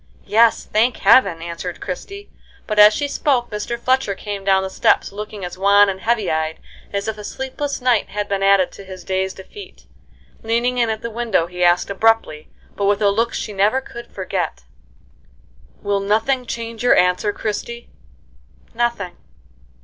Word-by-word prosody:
"Yes, 225 +2 +3
thank 225 +3 +1
Heaven!" 195 -6 +4
answered 170 +1 -6
Christie; 395 - -7 0.3
but 215 -1 -1
as 210 0 +9
she 290 +6 -2
spoke 260 -4 0
Mr. 210 +3 -3
Fletcher 255 -4 0
came 205 0 -6
down 190 -1 +3
the 190 - -3
steps - - +2
looking 210 -1 -7
as 180 +1 -8
wan 200 +1 +5
and 190 0 -5
heavy 225 -4 0
eyed 160 0 -2 0.3
as 200 +1 -3
if 220 -1 -4
a - - -8
sleepless 265 +5 -4
night 245 -4 +2
had 205 0 -3
been 200 -1 -2
added 195 -2 +4
to - - -12
his 185 -2 -10
day's 190 +1 -1
defeat. 195 - -12 0.6
Leaning 235 +2 0
in 235 -2 +2
at 220 0 -3
the 235 - -4
window, 225 -7 0
he 180 +1 -4
asked 175 +2 +3
abruptly, 210 -7 +1 0.3
but 200 - -1
with 200 0 +2
a 205 -2 +3
look 230 +3 0
she 210 - -5
never 205 +6 +2
could 235 -2 -10
forget: 185 - -4 1.2
"Will 200 0 0
nothing 225 +6 0
change 230 -1 -5
your 245 - +5
answer, 180 +3 +2
Christie?" 230 +3 -5 0.8
"Nothing." 235 -6 -2
210 Hz, 170 wpm, -20 LUFS, 190-235 Hz, 1.2 s, as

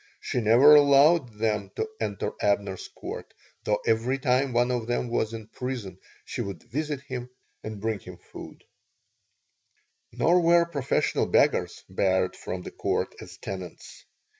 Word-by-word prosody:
She 125 - -2
never 120 +7 +7
allowed 140 -3 +5
them 105 -3 -1
to - - -2
enter 100 -3 -2
Abner's 100 -2 0
Court, - - -8 0.3
though 105 - +2
every 115 +4 +1
time 130 +1 +1
one 120 +1 +2
of 120 -2 -2
them 120 0 -1
was 110 -2 0
in 115 -1 -7
prison 110 -6 -6 0.3
she - - -4
would 95 -5 -6
visit 150 +1 -3
him 125 -3 -6 0.3
and 110 -1 -6
bring 110 0 -2
him 90 -1 -11
food - - -12 1.5
Nor 175 +3 +3
were 170 0 +5
professional 140 -6 0
beggars - - +2
barred 95 -1 +1
from 90 0 -6
the - - -8
Court - - -2
as - - -11
tenants. 95 -3 -8
115 Hz, 145 wpm, -26 LUFS, 100-135 Hz, 1.5 s, never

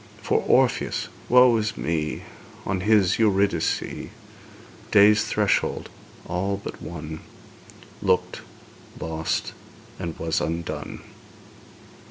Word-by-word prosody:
For - - +2
Orpheus - - +2 0.2
woe 125 -1 +7
is 110 0 -2
me! 80 -2 -2 0.4
On 95 - -1
his 105 -2 +3
Eurydice 100 -5 +2 1.1
Day's 105 +1 +6
threshold 105 -1 0 0.4
all 95 +3 -1
but 100 - -8
won 80 -2 -7 0.8
Looked, - - 0 0.6
lost, 80 0 -2 0.5
and 85 -3 -5
was 80 -1 -1
undone! 85 +1 -4
95 Hz, 90 wpm, -24 LUFS, 80-105 Hz, 1.1 s, woe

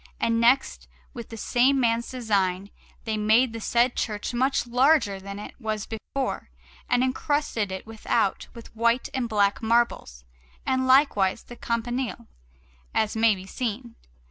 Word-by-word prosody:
And 230 0 +1
next, 250 +4 +2 0.3
with 235 -4 -8
the 225 - -8
same 255 +5 +2
man's 235 -1 +1
design, 200 -6 -1 0.3
they 220 -1 -2
made 225 +3 +3
the 230 - -6
said 240 +3 +2
church 210 +1 -3
much 260 +2 +1
larger 245 -4 +3
than 200 +1 -8
it 210 - -8
was 215 -3 -3
before, 255 - -4 0.4
and 245 - +3
encrusted 260 -5 -1
it 190 - -6
without 220 -1 -1
with 230 -1 -12
white 235 +2 +1
and 255 -3 -2
black 205 -2 +1
marbles, 225 - 0 0.4
and 260 0 0
likewise 255 -8 +3
the 240 - -11
campanile, 240 +1 -3 0.7
as 215 0 +1
may 220 -1 +4
be 185 0 -10
seen. 235 +2 -4
230 Hz, 145 wpm, -25 LUFS, 210-250 Hz, 0.7 s, may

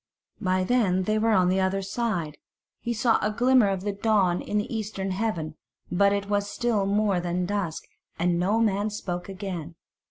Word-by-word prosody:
By 185 0 +1
then 190 -4 +2
they 215 +3 +1
were 225 +1 +2
on 185 -3 +4
the 185 +1 +2
other 190 +1 0
side 190 -7 -2 0.4
he 235 - -3
saw 230 0 +2
a 210 - +1
glimmer 245 0 +4
of 190 -2 -1
the 205 +1 -1
dawn 200 -4 +2
in 210 - -2
the 210 +2 -2
eastern 205 -3 -3
heaven, 180 -7 -2 0.3
but 200 +3 +4
it 200 0 -1
was 205 0 0
still 225 -5 0
more 200 -2 +2
than 175 +1 -1
dusk, 190 -4 -2 0.3
and 170 0 +1
no 200 +5 +2
man 210 -1 +1
spoke 180 -3 -5
again. 185 -4 -6
200 Hz, 185 wpm, -26 LUFS, 180-215 Hz, 0.4 s, on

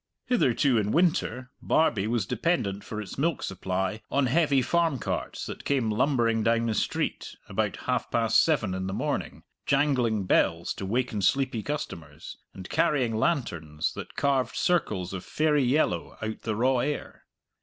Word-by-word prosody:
Hitherto 135 - +2
in 105 -1 -1
winter, 150 -7 +1
Barbie 110 -11 +2
was 115 -3 0
dependent 110 - -1
for 105 - -6
its 105 +4 -7
milk 165 +1 0
supply 95 +2 -2
on 140 -1 +2
heavy 140 0 +3
farm 165 -3 +1
carts - - -4
that - - -7
came 130 -6 +1
lumbering 115 -1 +2
down 115 +1 +2
the 115 - 0
street, - - -2
about - - -1
half - - -1
past 115 -1 +3
seven 125 - +1
in 95 0 -3
the 95 - -3
morning, - - -3 0.2
jangling 130 -7 +2
bells - - +2
to 95 - -6
waken 115 -1 -1
sleepy 130 +3 +1
customers, 145 - -6
and 95 -1 -9
carrying 125 -6 +1
lanterns 85 - -1
that - - -8
carved 135 -4 +1
circles 105 - 0
of 95 - -5
fairy 150 -2 +1
yellow 125 - 0
out 110 0 -5
the 110 -2 -2
raw 125 +3 +2
air. 145 +4 -4
120 Hz, 155 wpm, -27 LUFS, 105-140 Hz, 0.2 s, heavy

